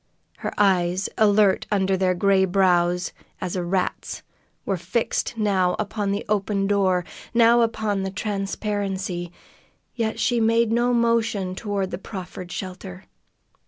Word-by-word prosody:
Her - - -4
eyes, 185 -2 +2
alert 205 -2 +3
under 195 -2 +2
their 185 -1 +1
gray 195 +1 +3
brows, 180 -1 +2 0.3
as 180 - -3
a 180 - -1
rat's, 185 +1 -2 0.4
were 195 - 0
fixed 230 +5 -2
now 190 -4 +2
upon 210 -1 -2
the 200 +2 -2
open 200 -1 0
door, 190 -3 +2 0.3
now 235 0 +6
upon 220 -3 0
the 190 - -2
transparency, 195 -2 -3 0.6
yet 225 -2 -2
she 240 -2 +2
made 230 0 +3
no 240 +1 +2
motion 230 -5 +1
toward 195 -1 -3
the 175 - -4
proffered 185 -2 -8
shelter. 185 0 -7
195 Hz, 130 wpm, -23 LUFS, 185-215 Hz, 0.6 s, now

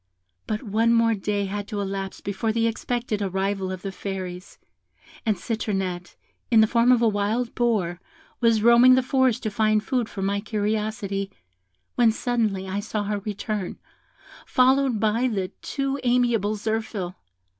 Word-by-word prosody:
But 215 +2 -2
one 225 +2 +2
more 230 0 +4
day 205 0 -1
had 205 +1 -4
to 210 -3 -4
elapse 195 -1 -4
before 200 +3 -2
the 230 +1 +1
expected 230 -1 -2
arrival 195 0 -1
of 185 -1 -6
the 195 - -3
Fairies, 185 -2 -6 0.7
and 215 -3 +2
Citronette, 190 -4 -3 0.3
in 230 - +5
the 220 - +7
form 235 +2 +3
of 240 -2 +4
a - - +5
wild 220 +3 0
boar, 205 -8 0 0.4
was 230 -3 +3
roaming 235 +2 +7
the 260 - +2
forest 260 -2 +2
to 215 - -1
find 215 0 +2
food 245 -2 -1
for 195 - -5
my 200 +1 0
curiosity, 210 -2 -2 0.6
when 235 -2 +4
suddenly 220 -5 -1
I 190 +2 -2
saw 210 0 -3
her 205 0 -2
return, 205 -1 -4 0.7
followed 260 -2 +3
by 225 +4 +2
the 195 -6 -2
too 275 0 -2
amiable 240 -4 +2
Zirphil. 215 -4 -3
215 Hz, 155 wpm, -24 LUFS, 195-235 Hz, 0.7 s, the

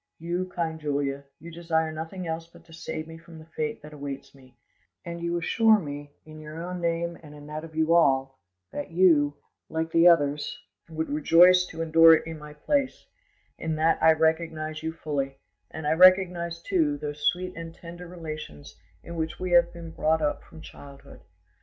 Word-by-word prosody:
"You, 175 +3 -3
kind 160 -2 -3
Julia, 140 -2 -2
you 170 +3 -10
desire 160 -1 -1
nothing 165 +4 -6
else 165 0 -4
but 170 0 -19
to 165 - -17
save 160 -1 -6
me 165 0 -10
from 165 0 -14
the 155 - -12
fate 155 -2 -4
that 150 0 -11
awaits 140 -2 -7
me; 130 -3 -20 0.5
and 170 0 -6
you 170 0 -1
assure 220 +6 +4
me 145 -5 -6 0.2
in 155 0 -12
your 155 +1 -9
own 180 +1 -5
name 170 0 -2
and 150 -2 -13
in 145 0 -12
that 155 +1 -6
of 160 -1 -11
you 160 +1 +2
all, 135 -5 +2 0.3
that 195 - -5
you, 165 -5 +4 0.3
like 160 0 -3
the 165 +1 +5
others, 145 -4 +2 0.3
would 160 0 -3
rejoice 175 +5 +5
to 165 - -5
endure 165 0 +7
it - - -3
in 160 -1 -7
my 150 0 -11
place; 275 - -1 0.5
in 160 -1 -2
that 160 +1 +2
I 160 - +7
recognise 160 -1 -1
you 160 0 -3
fully, 140 -4 -4 0.3
and 160 - -7
I 150 - +1
recognise, 175 -1 +4
too, 155 -7 +1
those 145 0 -3
sweet 180 +1 -1
and 165 0 -7
tender 175 +1 -11
relations 155 - -9 0.2
in 170 0 -8
which 160 0 -3
we 185 -1 -3
have 175 0 +5
been 170 -1 -9
brought 160 0 +1
up 145 - -1
from 80 - -14
childhood. 140 - -13
160 Hz, 190 wpm, -26 LUFS, 150-170 Hz, 0.5 s, endure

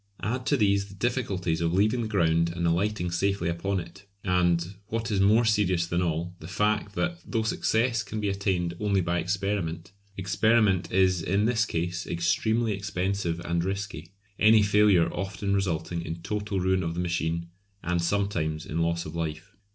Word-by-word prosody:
Add 125 +4 -2
to 145 - +3
these 100 -3 +2
the 100 - -13
difficulties 95 -8 -1
of 85 0 +1
leaving 110 +5 +2
the 110 - -2
ground 85 -5 +2
and 85 -1 -1
alighting 90 +2 0
safely 95 0 0
upon 95 +3 -1
it; 90 +3 -11 0.2
and, 90 -1 +1
what 115 +1 -3
is 100 - +1
more 110 +4 +5
serious 95 -6 +2
than 85 +1 -1
all, 85 +1 -2
the 80 - -9
fact 105 +1 0
that 175 +6 -1
though 115 -2 -1
success 115 +1 +1
can 105 +1 -5
be 105 - -1
attained 95 -3 -1
only 100 -2 +1
by 85 0 0
experiment, 90 -1 -2 0.3
experiment 100 0 +2
is 95 -2 +3
in 100 +5 +1
this 115 -2 +2
case 85 +1 -3
extremely 110 +7 +1
expensive 95 -3 -2
and 85 0 -1
risky, 95 -4 -4 0.3
any 110 0 +6
failure 100 -4 +4
often 95 +1 -2
resulting 85 -3 -1
in 85 0 -6
total 105 0 -2
ruin 95 0 +1
of 85 -1 -3
the - - -3
machine, 85 -1 -1 0.3
and 90 -1 0
sometimes 85 -4 -1
in 80 - -3
loss 85 +1 0
of 80 - -7
life. 85 +5 -4
95 Hz, 175 wpm, -27 LUFS, 85-105 Hz, 0.3 s, any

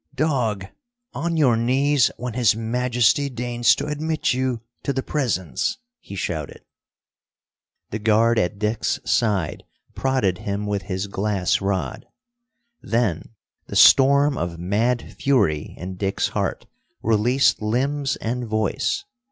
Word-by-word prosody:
"Dog, 125 -9 0 0.5
on 170 0 -2
your 135 -7 +4
knees 130 +3 +2
when 125 -1 -5
His 115 -3 +3
Majesty 125 +4 +1
deigns 120 -1 +2
to 140 - -4
admit 155 0 -1
you 130 -2 -1 0.2
to 140 - -2
the 130 0 -2
Presence!" 95 - -1 0.2
he 100 - -10
shouted. 80 -5 -4 1.3
The 110 - -3
guard 110 +2 +3
at 100 0 -1
Dick's 105 +2 -1
side 100 -9 0 0.3
prodded 130 -10 0
him 100 +1 -3
with 100 -1 -1
his 95 +1 -3
glass 100 -2 0
rod. 100 +3 -2 0.7
Then 115 -3 -1 0.3
the - - -7
storm 140 +1 +6
of 85 -1 -3
mad 110 +8 0 0.2
fury 125 - +1
in 90 +1 -7
Dick's 95 0 -1
heart - - -2 0.4
released 115 +5 +2
limbs 135 +6 0
and 120 +1 -3
voice. 110 - -1
115 Hz, 125 wpm, -22 LUFS, 100-130 Hz, 1.3 s, storm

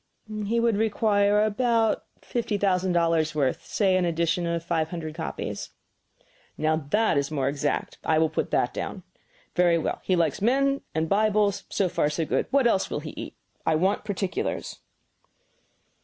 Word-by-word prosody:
"He 230 +2 +1
would 230 -3 +2
require 210 -1 +3
about 225 0 +1 0.2
fifty 230 -3 -2
thousand 185 -2 +1
dollars 165 -2 +2
worth 135 -4 0
say 195 -3 +2
an 185 - +2
edition 170 0 0
of 170 -1 -1
five 165 -2 0
hundred 160 -3 -5
copies." 160 0 -5 0.9
"Now 155 +1 +2
that 215 -5 +3
is 140 - -2
more 140 -4 -1
exact. 145 +1 -2
I 160 - +2
will 160 0 +4
put - - -1
that - - +1
down. - - -5 0.5
Very 175 -1 +4
well; 160 - -2
he 185 - +2
likes 165 -3 0
men 275 +5 +2
and 160 0 +1
Bibles; 205 0 +2
so 195 - +1
far, 150 -3 +1
so 160 +2 -1
good. - - 0
What 275 -2 +3
else 195 -5 +2
will - - -3
he 155 - -7
eat? - - -8 0.3
I 160 - +2
want 190 +6 +1
particulars." 195 -2 -3
180 Hz, 165 wpm, -26 LUFS, 160-210 Hz, 0.9 s, will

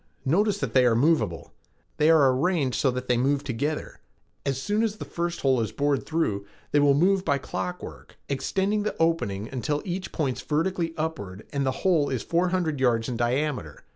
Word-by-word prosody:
Notice 200 +9 +2
that 135 -5 -3
they 130 - +5
are 115 - +3
moveable. 135 - +1 0.4
They 150 +1 +4
are 145 -5 +6
arranged 145 -3 +1
so 135 - +3
that 125 0 -3
they 125 - +2
move 140 +3 +1
together. 145 +4 -3 0.5
As 135 -1 0
soon 205 +10 0
as 220 -2 0
the - - -6
first 170 0 -3
hole 130 -3 +3
is 110 - -2
bored 145 -1 0
through, 105 -12 -1 0.2
they 145 - +4
will 145 -1 +5
move 185 +5 +3
by 140 -6 +1
clockwork, 180 +5 -6
extending 195 +9 0
the 210 - -2
opening 110 -12 0
until 145 +3 -2
each 185 0 -4
points 130 -6 -2
vertically 165 +1 -1
upward 110 -12 -4
and 140 -1 0
the 130 - -3
hole 165 -6 +3
is 130 -4 -2
four 170 +2 +1
hundred 170 -6 -1
yards 120 -3 +2
in 125 - -2
diameter. 125 - -1
145 Hz, 190 wpm, -26 LUFS, 125-170 Hz, 0.5 s, are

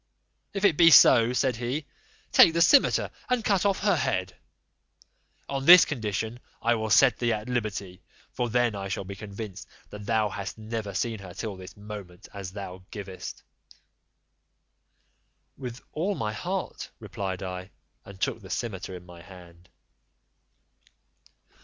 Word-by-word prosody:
"If 195 +1 +1
it 170 -7 +4
be 170 -1 +8
so," 120 -5 +7
said 125 -1 0
he, 125 +6 -3 0.5
"take 165 - +7
the 170 - +1
cimeter 280 +8 +4 0.2
and 250 -3 0
cut 200 -1 +2
off 195 - 0
her 200 -3 +3
head: 95 -10 -1 1.1
on 135 -1 -3
this 180 +2 +10
condition 110 -2 -3 0.2
I 120 +1 +2
will 110 -1 -2
set 120 +3 +5
thee 120 -1 +1
at 110 0 -3
liberty, 105 -7 -3 0.3
for 120 -1 -2
then 120 0 +2
I 100 -1 -5
shall 100 0 -3
be 100 +1 -7
convinced 100 -2 -8 0.2
that 105 0 -9
thou 110 -2 +2
hast 100 +1 -6
never 110 -2 -5
seen 115 -3 -2
her 95 -2 -11
till 105 0 -5
this 95 +1 -12
moment, 100 -4 -10
as 100 -2 -7
thou 95 -2 -8
gayest." 100 -3 -8 2.1
"With 125 -2 -7
all 185 +6 -1
my 105 -6 -3
heart," 90 - -4
replied 95 -2 -5
I, 90 0 -6 0.3
and 100 -1 -13
took - - -1
the - - -12
cimeter 95 -5 -4
in 90 0 -11
my 90 -1 -13
hand. 90 -2 -15
110 Hz, 150 wpm, -27 LUFS, 95-125 Hz, 2.1 s, this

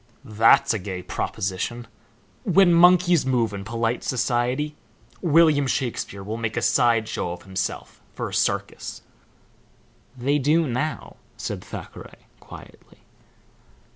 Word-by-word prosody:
"That's 110 0 +4
a 110 - -2
gay 90 -1 -6
proposition. 100 +8 -3 0.6
When 190 -4 +4
monkeys 175 -1 +5
move 120 -5 0
in 100 -1 -5
polite 115 +2 -2
society 130 +4 -1 0.5
William 155 -4 +4
Shakespeare 115 -6 -3
will 110 +3 -5
make 115 -1 -3
a - - +1
side 115 -4 +3
show 85 - -3
of 90 - -11
himself 95 -1 -5
for - - -3
a - - -11
circus." - - -2 1.1
"They 140 +4 +1
do 155 +4 +2
now," 140 +4 -3 0.2
said - - -5
Thackeray, - - -10
quietly. - - -15
120 Hz, 120 wpm, -23 LUFS, 110-150 Hz, 1.1 s, monkeys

